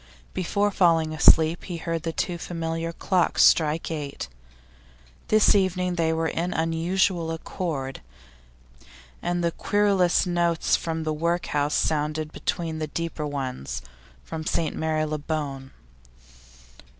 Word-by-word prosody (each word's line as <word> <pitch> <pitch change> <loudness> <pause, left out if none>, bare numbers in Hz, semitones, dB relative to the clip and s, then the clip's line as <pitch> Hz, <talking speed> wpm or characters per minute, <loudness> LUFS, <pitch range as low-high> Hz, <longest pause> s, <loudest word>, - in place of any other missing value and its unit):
Before 200 +3 0
falling 165 -5 +3
asleep 160 +1 +5
he 175 -2 -5
heard 165 0 -3
the 165 0 -2
two 170 +2 -2
familiar 165 -1 -3
clocks 180 +1 +2
strike 160 +1 +3
eight; 145 - -5 1.0
this 215 -1 +5
evening 185 -2 +1
they 165 -2 +1
were 160 0 0
in 170 +3 -2
unusual 165 +2 +1
accord, 155 -4 -4 1.2
and 175 0 -1
the 170 - +2
querulous 195 -2 +2
notes 170 -2 +2
from 165 -1 -3
the 155 -1 -1
workhouse 155 -2 0
sounded 155 0 0
between 160 -1 -3
the 155 - -2
deeper 165 -1 -3
ones 125 - -4 0.4
from 160 - -6
St 155 0 -1
Marylebone. 155 -3 -2
165 Hz, 115 wpm, -25 LUFS, 155-175 Hz, 1.2 s, asleep